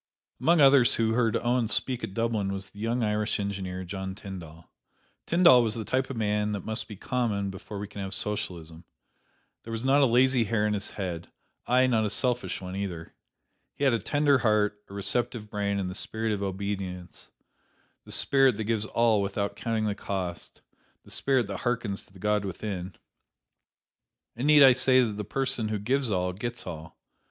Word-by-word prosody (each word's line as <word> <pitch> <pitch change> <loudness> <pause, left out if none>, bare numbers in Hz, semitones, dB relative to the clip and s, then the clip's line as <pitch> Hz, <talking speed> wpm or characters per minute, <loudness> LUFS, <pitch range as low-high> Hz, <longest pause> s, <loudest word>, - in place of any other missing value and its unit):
Among 170 0 +3
others 135 -3 +6
who 115 -1 +1
heard 115 -1 +1
Owen 120 -1 +1
speak 125 +2 0
at 95 - -5
Dublin 115 -4 0
was 100 0 -5
the 100 - -14
young 115 +3 -1
Irish 105 0 0
engineer, 95 -2 -4
John 95 +1 -5
Tyndall. 85 -5 -10 0.6
Tyndall 170 -8 +6
was 110 -2 0
the 110 -2 -4
type 130 +4 0
of 130 - -5
man 105 -1 0
that 100 - -5
must 110 0 -2
be 105 - -8
common 105 -3 -1
before 95 +2 -8
we 100 +1 -5
can 100 - -8
have 95 +1 -3
Socialism. 90 -7 -3 0.8
There - - -12
was 115 +2 -4
not 140 +2 +4
a 135 - +5
lazy 125 0 +3
hair 105 0 0
in 105 - +1
his 100 0 -2
head; 90 -4 -5 0.4
aye, 130 +1 +4
nor 115 -4 +2
a 105 - 0
selfish 125 +4 -1
one, 90 0 -6
either. 90 -5 -5 0.6
He - - -4
had 135 -3 +4
a 115 - +1
tender 145 +5 +2
heart, 105 -2 +1
a - - -11
receptive 105 +2 -1
brain 100 -1 -1
and 95 -2 -2
the 90 - -5
spirit 110 +3 -3
of 105 -2 -2
obedience, 95 -2 -5 0.7
the - - -13
spirit 135 -5 +3
that 110 - -2
gives 110 0 0
all 115 -2 +2
without 100 +1 -2
counting 110 -2 -1
the 105 - 0
cost, 95 -3 -5 0.4
the - - -15
spirit 130 -3 +1
that 100 -2 -5
harkens 120 -5 -2
to - - -24
the - - -14
God 105 +1 0
within. 95 -1 -5 1.4
And 125 +5 -2
need 150 -1 +8
I 130 -2 +9
say 130 0 +4
that 115 - -1
the 105 - -3
person 125 0 -1
who 105 0 -1
gives 125 +5 0
all, 90 -2 0
gets 120 +5 -5
all! 80 -2 -8
105 Hz, 190 wpm, -27 LUFS, 100-120 Hz, 1.4 s, I